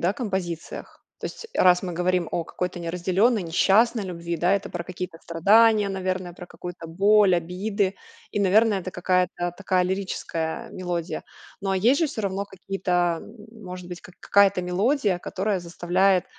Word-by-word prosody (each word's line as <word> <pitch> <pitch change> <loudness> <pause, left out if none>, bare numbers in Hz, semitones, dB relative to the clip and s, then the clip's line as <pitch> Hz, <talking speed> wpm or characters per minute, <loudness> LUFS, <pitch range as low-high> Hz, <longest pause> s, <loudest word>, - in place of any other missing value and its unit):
да, 175 +3 +2
композициях. 190 - -5 0.2
То - - -4
есть, - - -8
раз 180 0 +5
мы 180 - -4
говорим 180 0 0
о 170 - 0
какой-то 180 +1 -4
неразделённой, 185 +6 +1
несчастной 205 +7 +3
любви, 170 -2 -4
да, 175 +4 +2
это 200 - -3
про 175 - -4
какие-то 180 -1 -7
страдания, 210 +5 +4
наверное, 185 -2 -3
про 180 +1 -10
какую-то 175 -1 -8
боль, 200 +3 +4
обиды, 190 +3 -1 0.4
и, 205 - 0
наверное, 205 +1 +4
это 185 - -6
какая-то 180 -1 0
такая 185 -2 +1
лирическая 180 -3 -3
мелодия. 175 -2 -4 0.4
Но 195 0 -2
а 190 - +1
есть 240 - +3
же 325 - +3
всё 225 -6 -5
равно 195 0 -2
какие-то, 180 -3 -1
м 210 0 -13 0.2
может 180 -1 -8
быть, 175 -1 -7
как 180 - -15
какая-то 200 -2 +4
мелодия, 200 +3 +1
которая 195 +2 -2
заставляет 180 +2 +1
185 Hz, 160 wpm, -25 LUFS, 175-200 Hz, 0.4 s, раз